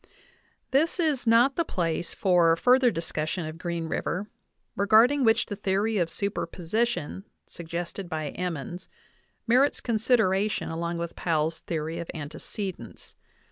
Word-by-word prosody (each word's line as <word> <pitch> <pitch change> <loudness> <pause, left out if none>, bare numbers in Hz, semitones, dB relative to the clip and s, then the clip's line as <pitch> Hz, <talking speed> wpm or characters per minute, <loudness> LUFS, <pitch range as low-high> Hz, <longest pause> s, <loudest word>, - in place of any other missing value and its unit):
This 315 +7 +2
is 300 -8 +1
not 240 +4 +5
the 335 - +3
place 170 - -2
for 175 -4 +3
further 250 +7 +4
discussion 165 -2 -3
of 155 +1 -7
Green 170 -2 -3
River, 190 +5 -2 0.5
regarding 225 +8 +5
which 225 0 +4
the 205 - -5
theory 200 +2 0
of 170 -2 +1
superposition 190 +1 -2 0.2
suggested 170 +2 -6
by 155 -3 -3
Em 180 +1 -3
mons 175 +6 -8 0.6
merits 255 +5 +3
consideration 215 -3 +1
along 170 +1 -3
with 170 0 -4
Powell's 160 -1 0
theory 160 0 -4
of 170 - -6
ante 150 0 -7
cedence. 185 - -7
185 Hz, 135 wpm, -27 LUFS, 165-225 Hz, 0.6 s, not